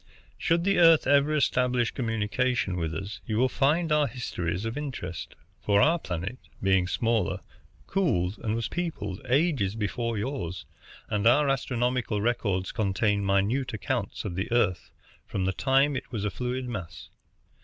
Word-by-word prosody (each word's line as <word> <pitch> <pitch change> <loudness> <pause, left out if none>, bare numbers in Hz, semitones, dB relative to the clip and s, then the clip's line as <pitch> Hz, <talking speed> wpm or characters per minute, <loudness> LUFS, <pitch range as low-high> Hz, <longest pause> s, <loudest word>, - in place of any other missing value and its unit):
Should 170 +1 +2
the 195 0 +2
Earth 165 -2 +7
ever 145 +2 +4
establish 125 -4 +2
communication 115 -2 0
with 80 -3 -2
us, 95 +6 -6
you 110 - -1
will 130 +3 +4
find 155 +6 +1
our 150 -1 +4
histories 95 -7 -3
of 115 +1 -3
interest; 130 - -5 0.3
for 100 -1 +3
our 165 +8 +4
planet, 95 - -4 0.2
being 95 -2 +3
smaller, 115 -2 0 0.4
cooled 100 - 0
and 110 0 -1
was 115 - -1
peopled 155 - -4
ages 130 - +2
before 115 +2 -2
yours, 105 - -4 0.5
and 105 +1 +2
our 145 +5 +5
astronomical 125 -4 0
records 100 -4 0
contain 100 -1 +1
minute 100 +6 +1
accounts 105 - -3
of 100 - -3
the 95 +5 -3
Earth 120 -7 +1 0.4
from 95 -2 -2
the 95 - 0
time 135 +6 +2
it 130 - -5
was 105 -4 -3
a 105 - -1
fluid 125 +1 -3
mass. 95 -9 -7
115 Hz, 155 wpm, -27 LUFS, 100-135 Hz, 0.5 s, Earth